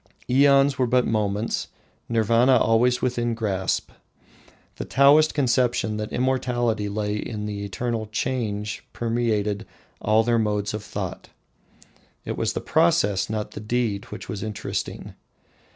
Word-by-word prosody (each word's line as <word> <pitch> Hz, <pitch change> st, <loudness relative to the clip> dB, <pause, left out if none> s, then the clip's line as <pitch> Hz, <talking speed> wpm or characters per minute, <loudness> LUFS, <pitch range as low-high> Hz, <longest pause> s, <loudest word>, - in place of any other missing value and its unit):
Aeons 140 Hz, +1 st, +4 dB
were 125 Hz, -, +3 dB
but 125 Hz, +1 st, +3 dB
moments 105 Hz, 0 st, -1 dB, 0.4 s
Nirvana 115 Hz, +3 st, +4 dB
always 120 Hz, +2 st, +2 dB
within 120 Hz, -2 st, 0 dB
grasp. 95 Hz, -5 st, -1 dB, 0.9 s
The -, -, -4 dB
Taoist 145 Hz, +4 st, +5 dB
conception 120 Hz, -5 st, +1 dB
that 105 Hz, 0 st, -4 dB
immortality 120 Hz, -4 st, 0 dB
lay 105 Hz, 0 st, -2 dB
in 105 Hz, -1 st, -5 dB
the 100 Hz, -1 st, -4 dB
eternal 110 Hz, +2 st, -3 dB
change 105 Hz, -2 st, -3 dB
permeated 110 Hz, -3 st, -1 dB, 0.4 s
all 110 Hz, +1 st, +3 dB
their 120 Hz, 0 st, +2 dB
modes 105 Hz, -1 st, -1 dB
of 105 Hz, -1 st, -4 dB
thought. -, -, -6 dB, 1.0 s
It -, -, -3 dB
was -, -, -1 dB
the -, -, -3 dB
process, 95 Hz, +3 st, +2 dB
not 105 Hz, -1 st, -3 dB
the -, -, -7 dB
deed, 110 Hz, -2 st, -1 dB
which 105 Hz, -, -9 dB
was 105 Hz, -4 st, -5 dB
interesting. 110 Hz, -2 st, -5 dB
110 Hz, 130 wpm, -24 LUFS, 105-125 Hz, 1.0 s, Taoist